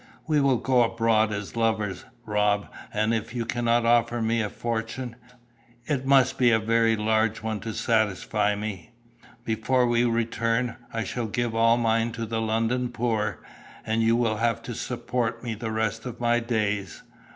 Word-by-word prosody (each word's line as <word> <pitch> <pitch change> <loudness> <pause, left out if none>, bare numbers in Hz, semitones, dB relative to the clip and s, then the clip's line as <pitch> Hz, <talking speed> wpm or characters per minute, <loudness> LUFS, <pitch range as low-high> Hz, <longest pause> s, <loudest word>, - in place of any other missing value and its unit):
We 150 -4 +2
will 135 -2 +3
go 125 +1 +2
abroad 115 -2 +2
as 105 +1 -5
lovers, 110 -4 -1 0.2
Rob, 105 -1 +1 0.2
and 110 +2 +1
if 115 +1 -3
you 115 -1 -1
cannot 120 0 +1
offer 120 0 +3
me 115 +1 +1
a 105 - -2
fortune 115 +2 -4 0.7
it 135 -2 -2
must 135 -1 +4
be 125 -2 +5
a 110 - +5
very 115 +1 +2
large 110 0 +1
one 110 -1 -2
to 115 - -5
satisfy 105 -1 +1
me 100 -3 -6 0.5
before 125 +3 +1
we 120 0 +2
return, 115 +1 0
I 115 0 -2
shall 115 +3 -3
give 120 +1 -2
all 115 +1 +4
mine 115 0 +1
to 115 -1 -4
the 115 0 -2
London 115 +3 0
poor, 110 -3 -2 0.4
and 110 +1 0
you 115 +1 +3
will 115 -2 +1
have 115 0 0
to - - -5
support 115 -2 -3
me 120 -2 -3
the 110 +1 -5
rest 110 +1 -2
of 120 -1 -7
my 120 0 +2
days. 105 -6 -2
115 Hz, 170 wpm, -26 LUFS, 110-120 Hz, 0.7 s, be